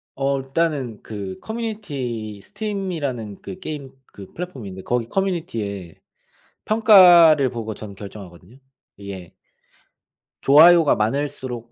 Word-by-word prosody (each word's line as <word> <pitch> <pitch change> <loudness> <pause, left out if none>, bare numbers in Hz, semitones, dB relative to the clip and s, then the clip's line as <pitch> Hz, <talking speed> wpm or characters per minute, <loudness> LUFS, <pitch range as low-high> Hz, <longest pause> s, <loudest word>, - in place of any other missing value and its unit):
어. 135 0 0
일단은 135 -5 -2
그 100 -3 -7
Community 140 - -5
Steam이라는 155 - -5
그 185 - -9
게임 145 -6 -7 0.2
그 100 -2 -12
플랫폼이 160 - -7
있는데 95 0 -9
거기 120 -2 -1
커뮤니티에 115 - -3 0.7
평가를 175 - +6
보고 110 -3 -5
저는 105 -2 -9
결정하거든요, 100 +1 -12 0.4
이게. 100 -3 -9 1.1
좋아요가 160 +2 +6
많을수록 120 0 -3
130 Hz, 325 characters per minute, -21 LUFS, 105-170 Hz, 1.1 s, 평가를